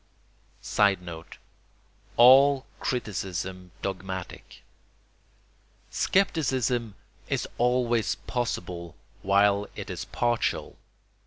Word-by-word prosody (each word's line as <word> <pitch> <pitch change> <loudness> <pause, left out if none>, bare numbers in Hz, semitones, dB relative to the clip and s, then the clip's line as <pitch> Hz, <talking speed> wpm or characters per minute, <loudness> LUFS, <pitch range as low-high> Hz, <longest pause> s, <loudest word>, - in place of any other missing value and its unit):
[Sidenote: 90 -5 0 0.8
All 135 +3 +7
criticism 95 -5 -3
dogmatic.] 95 -1 -6 1.3
Scepticism 130 - +1 0.3
is - - -1
always 120 -2 +2
possible 90 -8 -4 0.3
while 100 +1 +3
it - - -6
is - - -5
partial. 120 -1 -1
105 Hz, 65 wpm, -27 LUFS, 95-125 Hz, 1.3 s, All